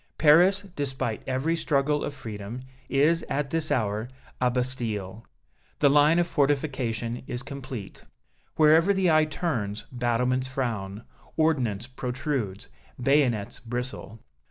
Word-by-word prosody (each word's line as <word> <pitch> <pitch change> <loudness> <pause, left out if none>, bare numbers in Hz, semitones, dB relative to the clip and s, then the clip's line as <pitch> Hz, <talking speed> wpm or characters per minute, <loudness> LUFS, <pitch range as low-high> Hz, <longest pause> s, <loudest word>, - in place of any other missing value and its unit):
Paris, 175 +6 +5
despite 130 -5 -2
every 135 +6 0
struggle 150 -2 +1
of - - -2
freedom, 110 -2 -7 0.3
is, 155 +5 +3
at 140 0 -1
this 165 -1 0
hour, 110 0 0 0.3
a 125 - +4
Bastille. 115 -5 -3 0.5
The 140 -2 +4
line 150 +3 +5
of 175 - +3
fortification 130 -6 -1
is 125 +1 -4
complete. 130 -7 -8 0.5
Wherever 160 +5 +5
the 185 -3 +3
eye 155 0 +5
turns 125 - -3
battlements 125 +1 0
frown, 115 -6 -3 0.3
ordnance 130 -10 +1
protrudes, 125 -5 -3 0.3
bayonets 125 -5 +1
bristle. 120 -2 -5
130 Hz, 115 wpm, -26 LUFS, 115-150 Hz, 0.5 s, Paris